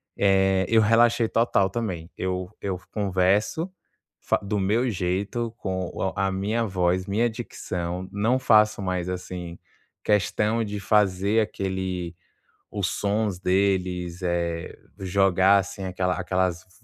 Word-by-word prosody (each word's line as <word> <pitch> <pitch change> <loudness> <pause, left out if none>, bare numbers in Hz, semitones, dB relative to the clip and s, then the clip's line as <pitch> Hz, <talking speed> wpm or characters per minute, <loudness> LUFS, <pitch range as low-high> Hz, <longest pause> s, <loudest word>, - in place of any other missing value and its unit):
eh, 95 -1 +3
eu 115 0 +5
relaxei 115 +1 +4
total 110 -4 +2
também. 90 -6 -4
Eu 90 0 -3
eu 95 -2 -3
converso, 100 - +1 0.5
fa - - +1
do 100 +1 -1
meu 110 +6 +1
jeito, 100 +4 -2
com 95 -4 -3 0.2
a 100 - +1
a 95 - -1
minha 105 +5 -1
voz, 90 -2 0
minha 115 +4 +1
dicção. 90 -4 -5
Não 110 +6 +1
faço 110 -4 +4
mais, 90 -1 -2
assim, 90 -2 -6 0.5
questão 105 +3 +1
de 105 -1 -4
fazer 105 0 +2
aquele 95 -4 -3 0.6
os 100 -4 -1
sons 100 -2 -1
deles, 90 -2 0
eh, 85 -1 -2 0.2
jogar 95 0 +4
assim, 100 0 -5
aquela 90 0 -1
aquelas 90 -2 0
v - - -32
95 Hz, 130 wpm, -25 LUFS, 90-105 Hz, 0.6 s, eu